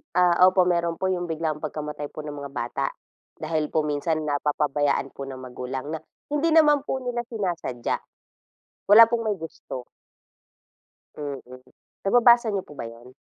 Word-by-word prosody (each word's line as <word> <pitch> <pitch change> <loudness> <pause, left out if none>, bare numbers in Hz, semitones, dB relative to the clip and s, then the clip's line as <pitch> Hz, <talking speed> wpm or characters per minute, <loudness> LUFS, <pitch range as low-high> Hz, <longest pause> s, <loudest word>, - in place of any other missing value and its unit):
Ah, 180 -1 +5 0.2
opo 185 -1 +3
meron 170 -2 +1
po 190 - -2
yung 180 -2 -1
biglang 155 -1 -2
pagkamatay 150 -1 -5
po 155 - -8
ng 150 - -5
mga 140 - -6
bata 120 -3 -2 0.5
dahil 155 -1 -1
po 155 -1 +1
minsan 155 +1 -1
napapabayaan 145 -1 0
po - - -10
ng 130 - -7
magulang 130 +1 -6
na 160 - -4 0.3
hindi 295 +3 +2
naman 300 -3 +5
po 275 - -2
nila 245 -2 -3
sinasadya. 175 - -2 0.9
Wala 220 +3 +10
pong 230 0 -1
may 205 - -1
gusto. 135 -5 -8 1.3
Mm, 145 -2 -5 0.6
nababasa 235 +3 +5
niyo 195 - -1
po 150 - -14
ba - - -4
'yon? 115 +2 -11
160 Hz, 155 wpm, -25 LUFS, 145-195 Hz, 1.3 s, Wala